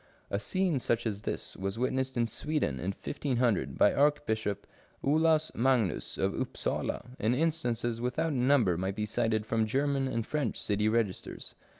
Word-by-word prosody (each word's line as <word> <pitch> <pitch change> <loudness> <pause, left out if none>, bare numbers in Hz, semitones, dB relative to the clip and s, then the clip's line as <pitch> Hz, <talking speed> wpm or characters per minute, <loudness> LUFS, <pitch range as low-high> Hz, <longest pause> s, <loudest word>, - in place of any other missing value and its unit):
A 100 - 0
scene 175 - +1
such 120 -1 0
as 105 -2 -2
this - - -4
was 95 +2 -3
witnessed 130 +1 -1
in 120 - +3
Sweden 135 - -1
in 65 - -4
1500, 125 0 -1
by 105 - +5
Archbishop 135 -8 +1 0.4
Olaus 155 +2 +3
Magnus 120 -5 +1
of - - +1
Upsala, 125 - -2
and 110 +4 +2
instances 120 -7 0
without 150 +6 0
number 125 -9 +3
might 95 +1 -2
be 105 0 -1
cited 110 0 0
from 110 0 +1
German 135 +3 +1
and 115 -3 -2
French 145 -6 -2
city 105 +1 +1
registers. 110 -4 -2
120 Hz, 155 wpm, -30 LUFS, 110-140 Hz, 0.4 s, by